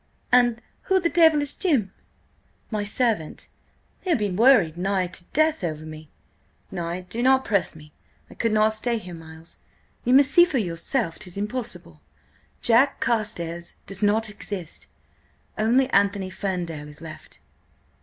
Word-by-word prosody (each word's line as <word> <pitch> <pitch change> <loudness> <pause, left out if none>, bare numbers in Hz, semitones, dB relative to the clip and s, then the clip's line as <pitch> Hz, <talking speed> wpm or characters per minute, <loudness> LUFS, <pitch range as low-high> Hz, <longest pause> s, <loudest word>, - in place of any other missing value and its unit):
"And 240 -1 +3 0.3
who 380 0 +4
the 340 -2 0
devil 320 -3 +5
is 290 - -2
Jim?" 260 - 0 0.8
"My 210 -2 -1
servant. 215 -6 -1 0.5
He'll 350 -6 +2
be 205 -3 -1
worried 200 -5 +4
nigh 190 +1 0
to 175 0 -9
death 310 - +1
over 155 -2 -3
me. 155 -1 -10 0.6
Nay, 175 +1 -4
do 225 +6 -4
not 265 +1 +4
press 200 -7 0
me, 150 -1 -15 0.3
I - - -14
could 230 - -1
not 215 0 +3
stay 235 +2 -1
here, 180 -5 -8
Miles. 165 0 -12 0.4
You 250 +2 +3
must 275 0 +6
see 345 - +8
for 345 -6 0
yourself 175 +1 -2
'tis 180 0 -10
impossible–Jack 200 - -2
Carstares 175 -7 -2
does 195 0 -6
not 215 +2 +2
exist; 200 -5 -8 0.7
only 240 +5 +3
Anthony 200 -1 +1
Ferndale 175 -6 -4
is 150 +1 -12
left." 160 -1 -11
205 Hz, 145 wpm, -24 LUFS, 170-245 Hz, 0.8 s, see